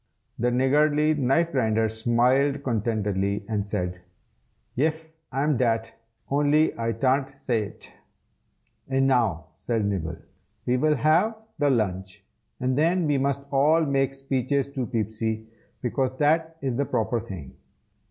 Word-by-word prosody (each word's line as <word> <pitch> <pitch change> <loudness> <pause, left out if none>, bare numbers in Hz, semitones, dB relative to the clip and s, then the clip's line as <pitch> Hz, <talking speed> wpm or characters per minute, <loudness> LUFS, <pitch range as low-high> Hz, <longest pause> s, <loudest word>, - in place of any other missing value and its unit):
The 120 - +2
Niggardly 150 +4 +3
Knife 150 +4 +1
Grinder 110 -5 +1
smiled 125 +5 +2
contentedly, 105 -4 -1
and 105 -3 -1
said, 90 -3 -3 0.7
"Yef, 160 +4 0 0.3
I'm 140 +1 +1
dat, 115 -2 0 0.4
only 145 +2 +3
I 115 0 -1
tan't 135 +3 0
say 115 -4 0
it." - - -13 1.0
"And 135 0 +2
now," 110 - +1
said 115 -3 -1
Nibble, 95 -6 -2 0.5
"we 125 +1 +2
will 150 +3 +2
have 210 +10 +1
the 145 -1 +3
lunch, 95 -7 -2 0.3
and 130 0 0
then 170 +4 +2
we 145 -2 +2
must 140 0 0
all 150 +4 +4
make 135 -1 0
speeches 135 0 -1
to 130 -4 -3
Peepsy, 110 -1 -2 0.4
because 130 +2 -1
that 160 +3 +1
is 130 -3 -1
the 140 +3 0
proper 115 0 0
thing. 95 - -8
130 Hz, 135 wpm, -25 LUFS, 110-145 Hz, 1.0 s, all